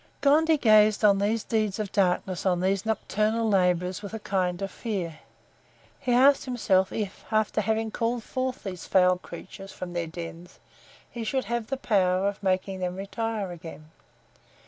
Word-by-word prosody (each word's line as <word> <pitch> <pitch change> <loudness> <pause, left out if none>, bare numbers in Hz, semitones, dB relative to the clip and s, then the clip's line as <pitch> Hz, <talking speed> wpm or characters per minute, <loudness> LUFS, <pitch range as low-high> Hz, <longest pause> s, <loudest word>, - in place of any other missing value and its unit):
Gondy 310 +3 +4
gazed 215 -4 +5
on 200 -1 +5
these 215 +2 0
deeds 215 -3 0
of 210 -3 -4
darkness, 185 -2 0
on 180 -2 +2
these 195 +3 0
nocturnal 220 +1 0
laborers, 180 -2 +1
with 205 +1 -7
a - - -5
kind 180 -3 -1
of 195 - -4
fear; 180 -9 -4 0.8
he 250 - -2
asked 270 +3 +5
himself, 200 -7 +1
if, 205 -3 -4
after 215 -1 +1
having 220 +1 -1
called 235 +1 -1
forth 255 +1 -3
these 185 -4 -6
foul 180 -1 +4
creatures 195 +3 -10
from 180 -1 -7
their 170 -1 -2
dens, 170 +1 -9 0.5
he 235 - -6
should 260 +4 -1
have 235 -2 -2
the 270 - -2
power 190 -5 +2
of 200 0 -3
making 190 0 -1
them 180 -1 -2
retire 205 0 -3
again. 160 -2 -10
200 Hz, 165 wpm, -26 LUFS, 185-225 Hz, 0.8 s, gazed